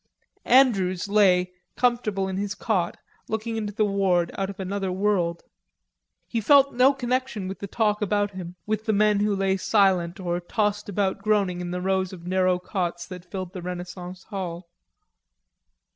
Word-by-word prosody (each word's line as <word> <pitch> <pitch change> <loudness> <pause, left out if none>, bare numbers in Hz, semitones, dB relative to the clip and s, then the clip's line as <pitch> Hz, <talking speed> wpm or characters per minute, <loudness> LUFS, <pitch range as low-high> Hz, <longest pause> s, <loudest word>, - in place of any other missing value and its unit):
Andrews 200 -9 +4
lay, 185 -3 +4 0.2
comfortable 230 -6 +1
in 190 0 -3
his 205 0 -2
cot, 190 -5 -1 0.3
looking 220 +1 -3
into 210 -2 -3
the 215 +1 +1
ward 190 -4 +1
out 195 0 -2
of 200 - -8
another 190 0 -2
world. 180 -3 0 0.8
He 230 - -2
felt 280 +4 +5
no 255 +3 +5
connection 255 -5 -2
with 190 - -6
the 200 - -5
talk 210 +1 0
about 205 0 +1
him, 180 -2 -8
with 215 0 -2
the 220 - +1
men 210 0 +3
who 205 0 +1
lay 195 0 +1
silent 190 -3 +2
or 175 -1 -1
tossed 205 +3 -1
about 195 0 -1
groaning 200 -4 +1
in 175 - -4
the 180 0 -3
rows 190 0 0
of 170 -2 -10
narrow 185 0 +2
cots 180 -2 -3
that 180 -1 -10
filled 185 -2 -5
the 185 - -6
Renaissance 180 +1 -7
hall. 175 -4 -6
195 Hz, 165 wpm, -25 LUFS, 180-210 Hz, 0.8 s, felt